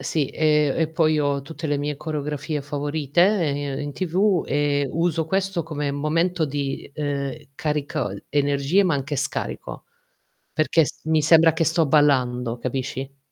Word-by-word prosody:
Sì, 150 -4 0
e 150 -2 +2
e 160 -1 +1
poi 155 -2 +2
ho 140 -1 0
tutte 155 +3 -7
le 145 - +1
mie 145 +1 -2
coreografie 150 0 -3
favorite, 145 +2 -1
ehm, 145 -8 +2
in 145 0 -4
TV, 185 +2 +1
e 145 -1 0
uso 165 -1 0
questo 190 +1 -1
come 150 -3 -3
momento 165 +4 0
di, 140 -2 -4
uhm, 140 -2 -2 0.2
carico 150 - -2 0.2
energie 145 +5 +2
ma 180 -5 +2
anche 140 +1 -2
scarico 135 - -4 0.7
perché 155 +1 +3
s - - -8
mi 160 -1 +2
sembra 165 +1 +6
che 165 +1 0
sto 160 +1 +2
ballando, 125 -5 +2
capisci? 135 +2 -4
150 Hz, 150 wpm, -23 LUFS, 140-160 Hz, 0.7 s, sembra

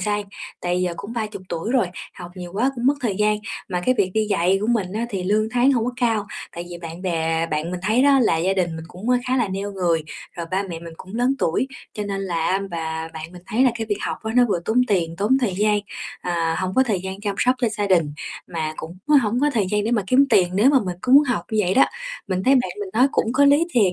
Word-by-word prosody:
gian, 205 +1 -1 0.4
tại 180 0 0
giờ 175 -1 -1
cũng 205 +3 -7
30 215 -4 -4
tuổi 170 +8 -3
rồi, 245 -7 +3 0.3
học 175 -1 -9
nhiều 180 -1 -8
quá 245 +7 +1
cũng 240 0 -2
mất 280 - +5
thời 220 -7 -1
gian. 210 0 +2 0.3
Mà 180 -1 -1
cái 255 - +4
việc 185 -2 +2
đi 215 -1 +2
dạy 185 +2 +3
của 210 - -1
mình 210 -6 0
á, 230 +3 -2
thì 190 -3 -3
lương 215 +3 +2
tháng 250 +3 +3
hông 230 -3 +1
có 250 - -2
cao, 225 -4 +1 0.3
tại 170 - -6
vì 175 - -7
bạn 170 +1 -8
bè 165 -2 0
bạn 155 +1 -2
mình 180 -1 -4
thấy 220 +6 +3
đó 280 -1 +5
là 215 - +3
gia 180 +4 +1
đình 175 -4 -1
mình 160 - -7
cũng, 195 +8 -4
ơ, 250 - +4
khá 255 - +2
là 235 -6 +1
neo 200 +2 -4
người, 170 -4 0 0.3
rồi 170 -1 -4
ba 190 +2 +1
mẹ 175 -4 -6
mình 165 -1 -9
cũng 190 +4 -11
lớn 245 +3 +2
tuổi, 170 +11 0 0.3
cho 210 - -3
nên 195 -1 -3
là 170 -4 -1
á 190 +1 +1
và 160 -1 -4
bạn 160 +2 -7
mình 180 -1 -12
thấy 235 +5 +1
là 255 - +5
cái 225 -1 -4
việc 205 -1 -1
học - - -2
á 220 - -3
nó 250 - +7
vừa 175 -4 0
tốn 220 +5 +1
tiền, 170 -4 0
tốn 215 +7 +2
thời 210 -7 0
gian, 210 0 +3 0.4
à, 165 -2 -1
hổng 185 0 -2
có 260 - +5
thời 215 -8 -1
gian 190 +1 -6
chăm 205 -1 -2
sóc 250 +1 +3
cho 245 - +1
gia 210 -1 -2
đình, 165 -6 +2 0.3
mà 160 -2 -3
cũng 165 +3 -8
á 300 - +6
hổng 230 +4 0
có 295 - +3
thời 205 -5 +2
gian 210 0 +1
để 225 - 0
mà 220 -4 +2
kiếm 270 +6 +5
tiền 180 -2 +5
nếu 220 +8 +5
mà 275 - +5
mình 180 -1 -4
cứ 255 - +1
muốn 285 +2 +9
học 245 -10 -1
như 220 - 0
vậy 190 -2 +1
đó. 270 - +7 0.4
Mình 185 -1 -1
thấy 270 - +5
bạn 250 -2 +2
mình 405 - -4
nói 255 - +5
cũng 225 - +1
có 285 +3 +4
lý 285 +3 +5
thiệt, 205 - +3
200 Hz, 280 wpm, -22 LUFS, 175-235 Hz, 0.4 s, muốn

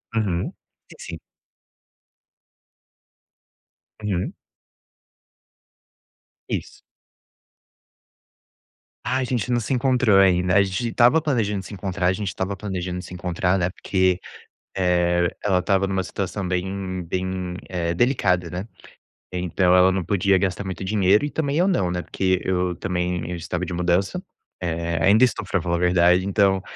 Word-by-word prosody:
Uhum. 95 -6 -1 0.4
Si - - -13
sim. 80 -2 -7 2.8
Uhum. 95 -3 -2 2.2
Isso. - - -4 2.2
Ah, 130 +2 0
a 130 - 0
gente 125 -2 -2
não 120 - +2
se 115 +4 -2
encontrou 125 -5 +3
ainda. 90 -1 +3
A 100 - +6
gente 95 +5 -2
estava 125 +8 +4
planejando 110 -9 0
de - - -14
se - - -10
encontrar, 95 -2 -2
a 95 - +3
gente 100 +1 -4
estava 95 +2 -3
planejando 90 -3 -4
de - - -8
se - - -10
encontrar, 90 +1 0
né? 90 0 0
Porque, 95 -1 0 0.6
eh, 90 -1 +2
ela 95 -3 +2
estava 95 +1 +1
numa 95 -1 -1
situação 95 +1 -4
bem 95 0 -3
bem, 90 +1 -3
eh, 85 -2 -2
delicada, 90 -8 +1
né? 90 +5 -5 0.7
Então 90 0 +1
ela 95 +1 +5
não 95 -2 -1
podia 100 -1 +2
gastar 95 +1 -1
muito 95 0 -5
dinheiro, 100 +3 +3
e 145 - -2
também 150 -1 -1
eu 185 +3 +3
não, 95 - +1
né? 90 0 -2
Porque 95 -1 0
eu 90 -1 0
também 90 -2 -2
eu 90 - -3
estava 85 +2 -4
de 90 - -5
mudança, 90 - 0 0.4
eh, 85 -1 -2
ainda 110 +6 +6
estou 125 - 0
pra 95 - -1
falar 85 0 -1
a - - -2
verdade, 90 +1 +4
então 100 -1 +2
95 Hz, 145 wpm, -23 LUFS, 90-100 Hz, 2.8 s, A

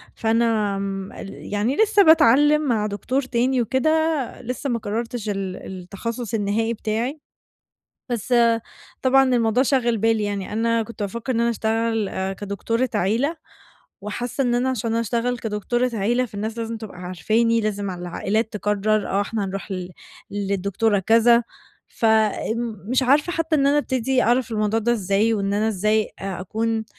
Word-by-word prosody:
فأنا 225 -3 +1
آمم 195 -1 -4
ال 195 - -9
يعني 220 +7 +1
لسّه 420 -2 +4
باتعلم 295 0 +5
مع 220 -4 +1
دكتور 230 +7 -1
تاني 255 0 +1
وكده 260 +7 +1 0.5
لسّه 250 +3 -4
ما 235 -1 0
قررتش 225 +1 -4
ال 195 -2 -3
التخصص 200 +6 -6
النهائي 220 +2 0
بتاعي، 230 +7 -2 0.9
بس 240 +1 -1 0.7
طبعًا 270 +1 +5
الموضوع 230 +1 +3
شاغل 240 -4 +2
بالي 225 0 +2
يعني 200 -1 -3
أنا 230 +1 +1
كنت 220 -2 -8
بافكر 235 +6 -3
إن 230 - 0
أنا 235 0 +2
أشتغل 220 -4 -1
كدكتورة 210 +5 -2
عيلة 235 - +1 0.7
وحاسّة 245 +5 -3
إن 240 -1 +1
أنا 250 +2 +1
عشان 230 -2 -2
أشتغل 235 +2 -1
كدكتورة 235 +3 -1
عيلة 240 +5 +1
فالناس 220 +2 -5
لازم 230 0 -3
تبقى 215 -5 -9
عارفاني 220 +6 +1
لازم 205 -2 -2
ع - - -4
العائلات 200 +6 -2
تقرر 210 0 0
آه 195 - +1
إحنا 205 0 -2
هنروح 195 +1 -5
ل 180 -1 -4 0.4
للدكتورة 200 +1 0
كذا 230 +4 +4 0.5
فآمم 220 -1 0
مش 260 +1 +2
عارفة 290 +7 +3
حتّى 325 -2 0
إن 275 -1 +2
أنا 290 +1 +4
أبتدي 260 -2 +1
أعرف 240 +1 +2
الموضوع 215 +1 +1
ده 240 +2 +1
إزاي؟ 210 +1 +1
وإن 200 -1 -1
أنا 215 +2 +1
إزاي 215 +1 +1
آآ 195 -2 -4
أكون 220 +3 -2
225 Hz, 150 wpm, -22 LUFS, 205-240 Hz, 0.9 s, باتعلم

